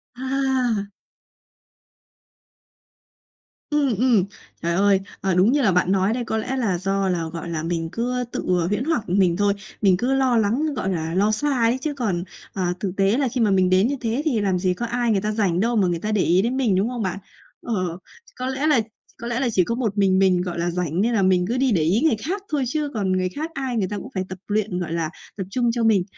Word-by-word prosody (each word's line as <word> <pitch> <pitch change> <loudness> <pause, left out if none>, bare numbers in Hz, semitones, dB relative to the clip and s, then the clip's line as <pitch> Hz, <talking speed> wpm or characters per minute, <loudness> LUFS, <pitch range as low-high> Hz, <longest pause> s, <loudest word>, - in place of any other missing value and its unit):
À! 260 -5 0 2.8
Ừm, 285 -5 +1
ừm. 235 -6 +3 0.4
Trời 170 0 0
ơi. 195 +1 +3 0.2
Ờ, 190 0 +1
đúng 190 +6 +4
như 285 +1 +2
là 215 - +3
bạn 180 +1 +2
nói 195 +2 +2
đây 245 0 -2
có 220 - -1
lẽ 260 +4 -2
là 210 -8 0
do 195 +1 0
là, 175 -2 0
gọi 170 0 -5
là, 160 -2 -3
mình 165 -1 -2
cứ 250 +4 -1
tự, - - -3 0.2
ờ, 170 - 0
huyễn 205 +5 -1
hoặc 295 - -1
mình 180 -2 +3
thôi. 205 0 +2 0.3
Mình 190 -3 +4
cứ 250 +6 0
lo 260 -3 +2
lắng, 250 +9 +1
gọi 190 -7 -2
là, 165 -3 -2
lo 205 +4 +2
xa 290 +7 0
ấy 230 +2 +3
chứ 300 0 -2
còn, 200 -10 -1 0.3
à, 180 -2 -1
thực 195 -3 -2
tế 195 +5 +3
là 280 - +1
khi 245 0 -2
mà 210 - +3
mình 185 -1 +3
đến 185 +5 +4
như 285 - -1
thế 230 +4 -1
thì 245 -9 +1
làm 190 -3 +1
gì 180 0 +1
có 235 +6 -4
ai 240 0 0
người 195 - +2
ta 215 +1 -1
rảnh 195 -5 +1
đâu 235 +4 +1
mà 195 -4 +3
người 170 -1 -1
ta 215 +3 -3
để 210 - +2
ý 180 +2 +3
đến 245 +4 -1
mình, 235 -8 +2
đúng 195 +5 +1
không 245 -4 -3
bạn? 190 +1 -2 0.4
Ờ, 235 - -3 0.6
có 255 +1 -4
lẽ 265 +3 -1
là 270 -7 +4 0.4
có 235 - -4
lẽ 240 0 -1
là 260 -3 +1
chỉ 185 -4 +3
có 230 - -2
một 220 -5 -2
mình 190 -1 +3
mình, 185 -2 +3
gọi 175 -1 -4
là, 170 +1 0
rảnh 175 0 -1
nên 235 +3 +1
là 220 - +2
mình 185 -1 +3
cứ 240 - -1
đi 260 -1 +2
để 175 -7 +2
ý 180 +9 +2
người 315 -6 +3
khác 385 +5 -2
thôi, 295 -3 0
chứ 300 +2 -1
còn 195 -4 -1
người 185 0 +1
khác 310 - -5
ai 265 -3 -3
người 195 -4 +1
ta 205 - -4
cũng - - -8
phải 185 -1 -1
tập 185 - -6
luyện, 205 -3 -1
gọi 170 -2 -4
là, 165 -2 -1 0.3
tập 195 - -2
trung 240 +2 +1
cho 235 0 -1
mình. 210 -5 +4
210 Hz, 250 wpm, -23 LUFS, 185-245 Hz, 2.8 s, đúng